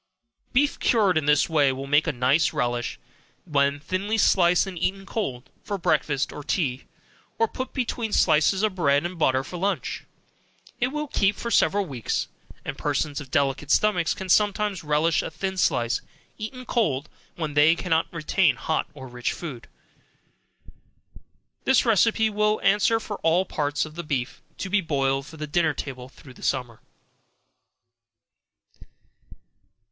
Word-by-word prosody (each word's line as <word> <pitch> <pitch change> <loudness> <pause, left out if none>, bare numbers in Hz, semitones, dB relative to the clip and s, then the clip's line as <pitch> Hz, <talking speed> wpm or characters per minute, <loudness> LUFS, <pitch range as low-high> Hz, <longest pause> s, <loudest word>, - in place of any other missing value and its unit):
Beef 280 +3 +2
cured 205 -6 +3
in 155 -2 0
this 150 -1 +4
way 150 -4 +3
will 135 +1 -5
make 145 +3 +3
a - - +2
nice 130 +5 +2
relish, 120 -1 -2 0.5
when 140 -3 +1
thinly 195 +8 -2
sliced 180 -4 +4
and 195 -2 -7
eaten 195 +2 -1
cold, 130 - -4
for 205 - -3
breakfast 145 -5 0
or 150 - -8
tea, 135 -6 -1 0.5
or 225 - +3
put 260 +4 -6
between 240 -3 -2
slices 190 +3 +3
of 215 -3 +2
bread 145 -3 +2
and 175 -1 -5
butter 130 -3 +2
for 180 - -7
lunch, 195 +3 -2 0.7
it 245 - +2
will 300 +3 -3
keep 205 -6 +1
for 235 - -5
several 200 -3 +3
weeks, 130 - -3 0.4
and - - -5
persons 145 -2 -1
of 135 - -11
delicate 140 +1 0
stomachs 180 -5 +2
can 190 - -6
sometimes 205 -1 +2
relish 150 +2 +2
a - - -5
thin 190 +4 -4
slice, 120 -10 +1 0.3
eaten 255 +4 -7
cold, 155 - 0 0.3
when 155 -3 -4
they 150 +3 +5
cannot 165 -2 0
retain 165 -2 +2
hot 160 +6 -1
or 130 -2 -9
rich 125 0 -3
food. 135 -9 -8 2.0
This 265 -1 +3
receipt 220 0 +3
will 210 +1 +1
answer 210 +3 +3
for 210 -2 -6
all 165 +3 +2
parts 145 -3 -1
of 155 - -11
the 170 - -5
beef, 130 -5 -3 0.2
to - - -4
be 205 +2 +2
boiled 135 -4 0
for 160 - -12
the 155 - -4
dinner 155 0 +1
table 130 -2 -6
through 130 +1 -15
the - - -17
summer. 125 -4 -2
165 Hz, 155 wpm, -25 LUFS, 140-200 Hz, 2.0 s, they